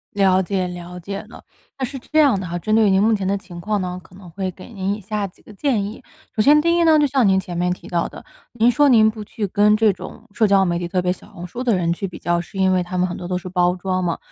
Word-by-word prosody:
了 190 -2 +4
解 185 -1 -1
了 180 0 -8
解 200 +3 -5
了。 - - -13 0.4
那 260 - 0
是 270 +1 -7
这 310 +6 0
样 275 -10 +4
的 185 - -5
哈， 175 +1 -3
针 215 +5 -2
对 220 -2 +4
您 190 0 +3
目 225 +1 +4
前 200 -3 -1
的 200 +1 +1
情 175 -3 -10
况 210 +1 -1
呢， 180 0 -4
可 180 - -19
能 180 -3 -13
会 190 +1 -3
给 185 +6 -12
您 195 0 -2
以 215 - -10
下 210 0 -3
几 180 - -21
个 215 - -14
建 230 -1 0
议。 210 +2 -8 0.3
首 215 - +2
先 295 +6 +6
第 335 +2 +2
一 345 - +3
呢， 320 -2 +5
就 295 - +4
像 265 -5 +2
您 190 0 +4
前 180 -2 -7
面 180 +1 0
提 180 - -6
到 170 -1 -1
的， - - -12 0.3
您 240 0 +3
说 290 +3 +4
您 220 -3 +5
不 215 -1 -8
去 210 +1 -4
跟 210 +2 +3
这 215 -2 +4
种 - - -10
社 220 +1 +3
交 195 -1 +4
媒 170 -1 0
体 175 - -3
特 180 0 -1
别 180 0 +1
小 - - -16
红 180 -3 -8
书 240 +8 -6
的 235 -6 +2
人 170 -1 +1
去 195 - -4
比 180 - -10
较， 175 +1 0
是 175 - -12
因 190 -1 +3
为 180 - +2
他 180 +1 -4
们 180 0 +2
很 180 - -5
多 175 - -7
都 180 0 -1
是 185 - -8
包 180 -1 +1
装 185 0 -2
嘛， 170 -2 -1
195 Hz, 325 characters per minute, -21 LUFS, 180-215 Hz, 0.4 s, 先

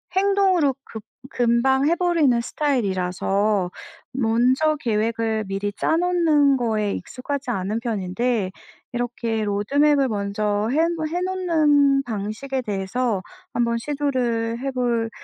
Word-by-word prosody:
행동으로 380 -7 +3
급 220 -2 -9 0.3
금방 255 +4 +2
해 340 - +3
버리는 330 -9 +2
스타일이라서 200 -7 0 0.4
먼저 255 +5 +2
계획을 220 -1 -1
미리 200 +1 -2
짜놓는 320 - +2
거에 215 -4 0
익숙하지 265 0 -4
않은 205 +1 -2
편인데 220 -1 -1 0.4
이렇게 235 -2 -2
로드맵을 275 +8 +2
먼저 205 +1 -1
한번 320 +1 +1
해 350 +2 -2
놓는 305 -7 +2
방식에 230 +4 -4
대해서 205 +1 -1 0.3
한번 235 -1 +1
시도를 240 -4 -1
해 270 +1 -3
볼 240 -3 0
245 Hz, 255 characters per minute, -23 LUFS, 215-290 Hz, 0.4 s, 행동으로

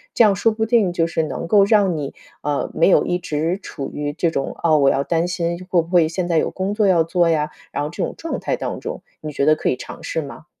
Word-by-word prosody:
这 235 - +6
样 200 -2 +4
说 225 +4 +2
不 220 0 -1
定， 225 -5 +3
就 165 -1 +1
是 160 -1 -1
能 155 +2 -4
够 200 +2 +5
让 200 -5 +3
你， 140 -2 -4 0.3
呃， 145 -1 -1
没 165 - +3
有 - - +5
一 180 - 0
直 165 +1 -2
处 140 -3 -6
于 145 0 -3
这 170 +2 0
种， 135 -3 -2
“啊， 160 -2 +3
我 140 -2 +4
要 140 - +1
担 165 +3 0
心 170 -1 -2
会 175 -2 +3
不 165 - -10
会 175 -3 +4
现 175 +2 -3
在 170 -2 +1
有 - - +2
工 190 +2 -2
作 210 -2 +2
要 170 -3 +4
做 170 +1 +2
呀”， 150 -1 0 0.2
然 145 - -2
后 150 - -3
这 170 - -4
种 - - -3
状 330 - -4
态 - - -1
当 - - -4
中， - - -6 0.2
你 155 -1 -5
觉 140 - 0
得 155 - +5
可 - - -1
以 125 - 0
尝 - - -9
试 160 - -2
吗？ 145 +3 -10
170 Hz, 295 characters per minute, -21 LUFS, 155-185 Hz, 0.3 s, 这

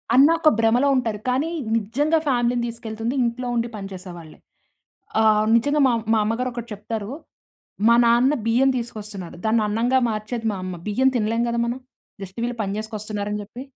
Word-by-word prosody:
అన్న 270 +3 +8
ఒక 315 -2 +5
భ్రమలో 235 +5 +3
ఉంటారు. 225 -4 -1
కానీ 270 +6 0 0.3
నిజంగా 285 +10 +1
ఫ్యామిలీ‌నీ 245 -2 +1
తీసుకెళ్తుంది 230 +1 -4
ఇంట్లో 240 +2 -2
ఉండి 235 0 0
పని 195 -2 -6
చేసేవాళ్ళే. 175 -4 -10 0.8
ఆ! - - +3 0.3
నిజంగా 285 +6 +2
మా - - +3 0.2
మా 220 - +3
అమ్మగారు 240 +4 -1
ఒకటి 235 -1 -7
చెప్తారు. 210 +2 -5 0.8
మా 235 - +6
నాన్న 240 +4 +4
బియ్యం 245 +4 +3
తీసుకొస్తున్నారు. 210 -7 -7
దాన్ని 220 0 +3
అన్నంగా 235 +5 +2
మార్చేది 220 +2 -4
మా 200 - -4
అమ్మ. 185 -1 -5
బియ్యం 260 +6 +3
తినలేం 230 0 +1
కదా 235 - -1
మనం. 240 +2 -3 0.4
జస్ట్ 190 +2 -8
వీళ్ళు 240 0 -3
పని 195 -1 -2
చేసుకొని 215 0 -5
వస్తున్నారు 210 -1 -4
అని 210 0 -2
చెప్పి. 235 +5 -9
230 Hz, 170 wpm, -23 LUFS, 210-245 Hz, 0.8 s, అన్న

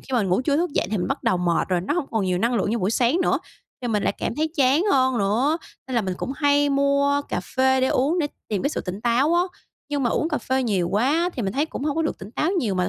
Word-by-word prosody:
khi 265 - -12
mà 240 - +3
ngủ 185 +1 +1
trưa 285 +1 +1
thức 345 +2 0
dậy - - 0
thì 215 - 0
mình 180 - -2
bắt - - -2
đầu 185 - +2
mệt 175 0 0
rồi, 180 -2 +1
nó 200 +11 -2
hông 340 -6 -1
còn 220 -4 0
nhiều 180 -1 0
năng 235 +5 +1
lượng 205 -2 0
như 235 - 0
buổi 190 -1 0
sáng 245 +8 +2
nữa, - - +2 0.4
thì 245 - -2
mình 210 -3 0
lại - - +1
cảm - - -2
thấy 310 +3 0
chán 275 +4 +4
hơn 260 -2 +3
nữa, 240 +11 +1 0.3
nên 260 - -4
là 235 - +3
mình 190 -3 -3
cũng 260 - -4
hay 290 -1 +3
mua 280 +1 +2
cà - - -2 0.2
phê 265 0 +3
để 260 - +3
uống 295 +8 +1
để 305 - +1 0.2
tìm 205 -3 -1
cái 280 - +1
sự - - -3
tỉnh 185 +2 -6
táo 245 +7 +2
á. 350 - +4 0.5
Nhưng 285 -1 -1
mà 240 - +1
uống 315 - 0
cà 305 - -1
phê 260 0 -1
nhiều 195 -7 0
quá 295 - +1
thì 240 - -2
mình 195 - -2
thấy 285 +6 0
cũng 285 - -6
hông 295 -1 -1
có 325 - +1
được 315 - -2
tỉnh 200 - -9
táo 310 +7 0
nhiều 215 - 0
mà 180 0 0
260 Hz, 305 wpm, -23 LUFS, 205-290 Hz, 0.5 s, chán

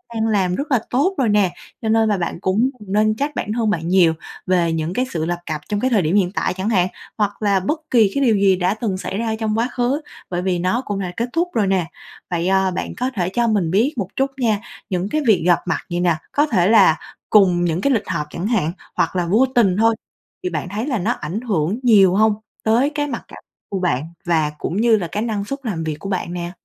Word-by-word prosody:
đang 225 0 0
làm 190 -4 +1
rất 285 +6 -4
là 255 - +4
tốt 320 +10 +1
rồi 255 -5 +2
nè. 205 -4 +2 0.3
Cho 220 - -2
nên 220 0 +3
là 205 - +1
bạn 170 -1 -3
cũng 215 +7 +2
đừng 205 -2 -10
nên 215 +1 +3
trách 285 +5 -2
bản 210 - -3
thân 225 -2 0
bạn 165 -5 -1
nhiều, 175 -2 +4 0.3
về 175 -3 +2
những 160 +1 -2
cái 250 +5 0
sự 160 -2 -2
lập 175 +1 -2
cập 155 -2 -4
trong 205 - 0
cái 255 - +1
thời 220 -6 +3
điểm 165 +3 0
hiện 185 -3 +2
tại 195 - -1
chẳng 190 +3 -2
hạn, 185 -5 +3 0.3
hoặc 205 -1 -1
là 200 -2 +3
bất 295 - -1
kỳ 220 -5 +4
cái 280 - +2
điều 230 -4 +4
gì 195 -1 +4
đã 180 +1 +1
từng 215 -3 -2
xảy 190 +1 -4
ra 225 0 -1
trong 220 -1 -1
quá 230 +2 +1
khứ, 255 +5 0 0.3
bởi 175 -1 -2
vì 180 -1 0
nó 185 +8 0
cũng 205 -1 -3
đã 185 -2 -3
kết 235 +2 -1
thúc 340 +2 +1
rồi 210 -4 +1
nè. 190 -3 +1 0.4
Vậy, 170 0 0
ờ, 190 0 +2
bạn 180 - -4
có 255 +1 0
thể 180 -3 0
cho 235 +4 0
mình 200 -7 +1
biết 230 - +2
một 200 -5 -1
chút 270 +1 0
nha, 220 -5 +1 0.3
những 185 0 -1
cái 310 - 0
việc 200 -7 +4
gặp 175 -1 +4
mặt - - 0
vậy 175 0 -2
nè, 175 -2 +2 0.2
có 290 - +3
thể 185 -10 +2
là 200 -8 +6 0.3
cùng 185 -4 +4
những 170 +1 0
cái 280 - +2
lịch 220 -4 -1
họp 150 -2 -2
chẳng 175 +6 -4
hạn 205 -9 +1 0.2
hoặc - - 0
là 180 -1 +1
vô 215 +10 +4
tình 200 -7 +4
thôi 225 +1 +3 0.5
thì 180 - -1
bạn 165 0 -4
thấy 215 +7 -3
là 260 -5 0
nó 205 +6 0
ảnh 180 0 -4
hưởng 200 -3 -1
nhiều 200 -6 +5
hông 215 +1 +4 0.3
tới 235 +6 +3
cái 290 -1 -2
mặt - - -5
cảm - - -12 0.3
của 195 - -2
bạn 170 -7 0 0.2
và 160 -3 +1
cũng 175 - -3
như 230 -1 +5
là 180 -4 -3
cái 210 +4 -1
năng 215 -3 -2
suất 275 +6 -4
làm 190 -9 -3
việc 155 -1 -2
của 195 - -6
bạn 180 -2 -2
nè? 175 -1 -4
200 Hz, 260 wpm, -20 LUFS, 180-225 Hz, 0.5 s, là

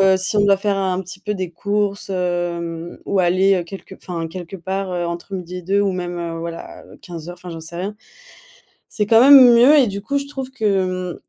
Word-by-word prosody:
heu, 190 0 +5
si 190 +3 -1
on 205 - +4
doit 200 -1 +5
faire 200 0 -1
un 190 -1 -1
petit 185 +1 -10
peu 210 +1 -3
des 185 -3 -5
courses, 200 +2 -2
hem, 175 -2 -3
ou 200 - +1
aller, 185 +2 +3
heu, 180 - 0
quelque 190 +2 -10
enfin, 170 -3 -5
quelque 180 +2 -8
part, 190 +2 -4
heu, 175 -1 -2
entre 170 +3 -6
midi 180 0 -6
et 180 - -9
deux 195 +3 +1
ou 200 -1 +1
même, 175 -1 -4
heu, 170 -1 -4
voilà, 165 0 -8
heu, - - -15
15:00 175 -2 -8
enfin, 180 0 -10
j'en 165 -1 -7
sais 165 +2 -8
rien. 195 +4 -4 1.0
C'est 210 - -1
quand 225 +1 +5
même 260 -1 +9
mieux 260 +6 +6
et 260 - +5
du 200 0 -5
coup 280 +7 -2
je 280 - -6
trouve 265 -2 -6
que, 185 -7 -1
190 Hz, 230 wpm, -20 LUFS, 175-200 Hz, 1.0 s, même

